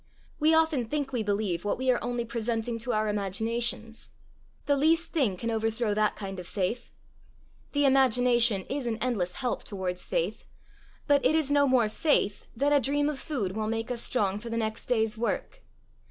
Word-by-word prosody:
We 315 +1 +4
often 320 -6 +2
think 285 +2 -2
we 245 -3 -1
believe 200 -4 -1
what 205 - -1
we 260 +1 +2
are 245 - -1
only 240 -1 -2
presenting 230 0 -2
to 240 +2 -2
our 215 0 +1
imaginations. 225 +3 -2 0.6
The 285 - +3
least 325 +4 +2
thing 250 - +1
can 230 +5 -2
overthrow 225 0 0
that 210 0 +1
kind 195 -2 -6
of 180 - -8
faith. 205 +6 -2 0.8
The 290 -1 +2
imagination 245 -5 +3
is 275 -2 -3
an 225 -2 -1
endless 210 -8 -1
help 250 -2 -2
towards 185 -3 -3
faith, - - -1 0.6
but 285 -1 +3
it 310 - +3
is 310 -3 +1
no 285 0 +4
more 255 -4 +4
faith 210 -3 0
than 285 +3 +2
a 290 - +6
dream 290 +3 +1
of 290 -3 -4
food 210 -11 -3
will 215 -1 -1
make 225 +2 -2
us 240 -1 -2
strong 205 -6 0
for 235 +2 -8
the 230 - -2
next 220 -1 -3
day's 220 -2 +1
work. - - -2
235 Hz, 185 wpm, -28 LUFS, 215-270 Hz, 0.8 s, a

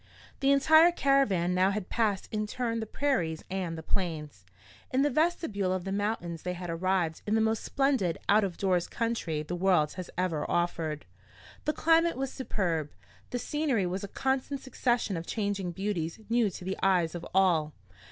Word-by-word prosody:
The 275 0 +3
entire 315 +5 +6
caravan 270 - +2
now 185 +1 +3
had 200 -1 -3
passed 210 -4 0
in 215 -1 -1
turn 230 0 -2
the 220 - -4
Prairies 200 - -1
and 180 -4 -2
the 160 - -7
Plains. 150 - -3 0.4
In 260 +2 +2
the 290 - +2
vestibule 255 - 0
of 185 -1 -1
the 195 - -4
mountains 195 -5 -2
they 180 - -3
had 175 -1 -5
arrived 175 -1 0
in 210 - +2
the - - +3
most 220 0 +1
splendid 265 - +1
out 210 +1 +5
of 185 -4 -3
doors 185 -3 +1
country 225 -10 -2
the 170 +3 -4
world 175 -5 +2
has 185 -1 -7
ever 175 -5 -1
offered. 165 -3 -1 0.6
The 305 - +1
climate 330 0 +3
was 270 0 -2
superb, 170 - -2 0.4
the 245 - -2
scenery 270 -6 0
was 185 +2 -3
a - - -3
constant 265 +5 -1
succession 240 -6 0
of 165 - -6
changing 200 -4 -2
beauties 180 -2 -3
new 230 -2 +3
to 180 0 -9
the 190 +1 -3
eyes 180 -4 +2
of 175 -1 -6
all. 165 -6 +3
195 Hz, 180 wpm, -29 LUFS, 175-240 Hz, 0.6 s, entire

